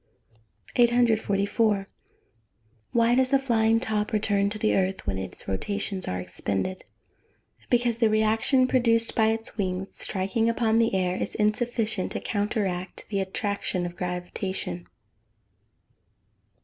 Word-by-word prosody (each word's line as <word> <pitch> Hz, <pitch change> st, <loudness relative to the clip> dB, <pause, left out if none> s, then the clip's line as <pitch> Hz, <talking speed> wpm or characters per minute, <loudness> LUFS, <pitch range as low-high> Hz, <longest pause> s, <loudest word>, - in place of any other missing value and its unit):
"] 105 Hz, -2 st, -27 dB
844. 220 Hz, -4 st, +2 dB, 1.0 s
Why 235 Hz, 0 st, +3 dB
does 255 Hz, +1 st, +3 dB
the 275 Hz, -, +5 dB
flying 225 Hz, -4 st, +2 dB
top 215 Hz, -3 st, -1 dB
return 205 Hz, -2 st, +2 dB
to 210 Hz, -, -5 dB
the 215 Hz, 0 st, +1 dB
earth 190 Hz, 0 st, 0 dB
when 95 Hz, -1 st, -2 dB
its 95 Hz, -1 st, -7 dB
rotations 195 Hz, -, -2 dB
are 90 Hz, -, -2 dB
expended? 100 Hz, -, -3 dB, 0.9 s
Because 240 Hz, -1 st, +2 dB
the 225 Hz, -2 st, +4 dB
reaction 220 Hz, +4 st, +3 dB
produced 230 Hz, -3 st, +2 dB
by 220 Hz, -1 st, +3 dB
its 225 Hz, 0 st, -2 dB
wings 185 Hz, -1 st, -3 dB
striking 195 Hz, +4 st, 0 dB
upon 230 Hz, -1 st, +2 dB
the 230 Hz, -3 st, +2 dB
air, 180 Hz, -1 st, +1 dB
is -, -, -3 dB
insufficient 220 Hz, -1 st, 0 dB
to -, -, -2 dB
counteract 205 Hz, -3 st, -2 dB
the 200 Hz, -2 st, -1 dB
attraction 190 Hz, -1 st, -2 dB
of 175 Hz, 0 st, -6 dB
gravitation. 180 Hz, -, -4 dB
210 Hz, 125 wpm, -26 LUFS, 185-230 Hz, 1.0 s, the